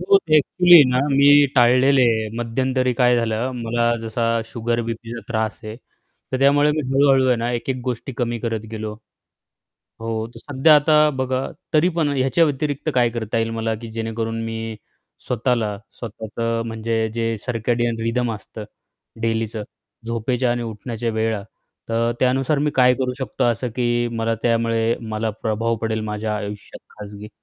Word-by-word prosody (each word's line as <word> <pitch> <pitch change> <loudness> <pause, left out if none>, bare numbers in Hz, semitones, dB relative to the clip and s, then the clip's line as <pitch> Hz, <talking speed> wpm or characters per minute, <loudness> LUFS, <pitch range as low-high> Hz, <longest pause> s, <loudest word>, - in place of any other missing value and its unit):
हो, 195 +2 +5
ते 155 - +4
ॲक्च्युअली 175 +1 +6
ना, 125 - +2
मी 145 +1 +6
टाळलेले 130 +2 +5
आहे. 110 -2 +1
मध्यंतरी 130 +2 0
काय 125 0 +4
झालं, 115 +2 -1
मला 120 +1 +1
जसा 115 +1 -3 0.2
शुगर, 115 +1 -2
बीपीचा 115 0 -6
त्रास 110 0 -2
आहे, 110 0 -7 0.6
तर 130 - 0
त्यामुळे 145 +2 +4
मी 155 - 0
हळू-हळू 135 -1 +4
आहे 125 -1 +3
ना, 115 +1 -2
एक-एक 120 +2 -2
गोष्टी 125 +2 -4
कमी 120 -1 -1
करत 115 -1 -2
गेलो. 110 -1 -5 1.1
हो, 110 -1 -3
तर - - -10
सध्या 145 +2 +3
आता 150 +1 +4
बघा 130 0 -1 0.3
तरी 160 +4 +4
पण 160 -3 +2
ह्याच्या 135 +6 +3
व्यतिरिक्त 145 0 -2
काय 120 -2 +3
करता 115 0 -3
येईल 115 0 0
मला, 115 0 -2
की 115 +1 -8
जेणेकरून 115 0 -3
मी 115 0 -5 0.5
स्वतःला, 115 -3 0 0.2
स्वतःचं 115 +1 -3
म्हणजे 110 0 -1
जे 115 -1 -1
सर्केडियन 120 -1 -1
रिदम 115 +1 0
असतं, 105 +1 -9 0.6
डेलीचं 115 -1 -1 0.4
झोपेच्या 120 +2 -1
आणि 120 0 -1
उठण्याच्या 115 +1 -4
वेळा, 110 -1 -1 0.5
तर 115 +1 +1
त्यानुसार 130 +3 +2
मी 150 +1 +1
काय 125 -1 +5
करू 130 -1 -2
शकतो, 130 - -2
असं 120 +1 0
की 120 -1 +1
मला 115 0 0
त्यामुळे 115 -1 +1 0.2
मला 110 +1 -1
प्रभाव 115 +1 0
पडेल 110 -1 -1
माझ्या 105 0 -2
आयुष्यात. 105 0 -7 0.2
खाजगी 105 0 -9
115 Hz, 155 wpm, -21 LUFS, 115-130 Hz, 1.1 s, ॲक्च्युअली